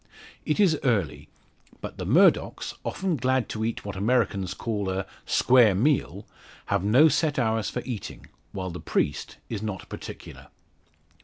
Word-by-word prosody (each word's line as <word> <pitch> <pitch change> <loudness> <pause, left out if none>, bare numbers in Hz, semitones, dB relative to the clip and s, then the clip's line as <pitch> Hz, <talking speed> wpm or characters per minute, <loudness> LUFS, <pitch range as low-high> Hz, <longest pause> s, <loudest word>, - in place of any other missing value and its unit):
It 150 - 0
is 175 -7 +4
early; 105 - 0 0.5
but - - -8
the - - -4
Murdocks, - - +3
often 185 -5 -2
glad 130 -1 +1
to 110 - -3
eat 115 -1 -3
what 100 -2 -5
Americans 100 -3 0
call 105 -4 -3
a 95 +1 -2 0.2
"square 120 -6 +5
meal," 140 +9 0 0.5
have 100 -2 +1
no 125 +10 +6
set 155 -1 +1
hours 110 -4 0
for 125 - -4
eating, 120 -6 -6 0.3
while 95 -1 -4
the 90 - -7
priest 70 - -2
is 105 -3 -4
not 105 -4 -5
particular. - - -9
110 Hz, 150 wpm, -26 LUFS, 100-130 Hz, 0.5 s, no